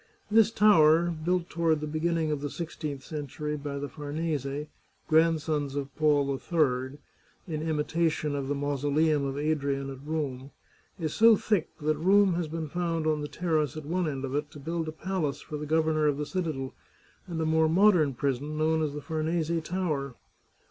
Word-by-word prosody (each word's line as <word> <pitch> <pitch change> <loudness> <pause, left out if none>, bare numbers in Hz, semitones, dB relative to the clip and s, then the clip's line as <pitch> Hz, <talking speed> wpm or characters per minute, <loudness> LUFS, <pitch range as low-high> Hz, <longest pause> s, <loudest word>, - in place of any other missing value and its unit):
This 220 -1 +6
tower, 175 -6 +5
built 170 +2 -1
toward 165 -2 +1
the 150 - -4
beginning 160 +1 0
of 150 -2 -2
the 145 - -3
sixteenth 150 -4 -5
century 150 0 -4
by 145 -1 -5
the 145 +1 -3
Famese, 145 0 -3 0.4
grandsons 155 -3 +2
of 140 -1 -4
Paul 150 -2 +3
III, 135 -3 0 0.5
in 155 -3 -3
imitation 155 -1 0
of 140 -1 -3
the 145 - -1
Mauso 145 0 -1
leum 150 0 +2
of 135 0 -4
Adrian 140 -2 -1
at 135 0 -10
Rome, 140 -4 -3 0.5
is 155 -3 -2
so 225 0 +7
thick 205 -4 0
that 155 0 +1
room 195 +3 +4
has 170 -1 -1
been 160 0 -4
found 165 0 -2
on 155 -1 +1
the 145 - -3
terrace 155 -3 -1
at 155 - -7
one 175 +2 0
end 135 -2 -3
of 130 - -5
it, 145 +1 -1
to 145 - -12
build 165 +3 -3
a - - -3
palace 155 -3 -2
for 150 - -6
the 150 0 -5
governor 155 -1 +2
of 145 -1 +1
the 150 - -2
citadel, 155 -7 -3 0.5
and 170 -3 -4
a 160 - 0
more 160 0 +3
modern 170 -6 +4
prison, 140 +3 -2
known 160 +1 +2
as 150 -2 -1
the 150 - -6
Farnese 160 0 -1
Tower. 155 -8 -2
155 Hz, 185 wpm, -28 LUFS, 145-165 Hz, 0.5 s, so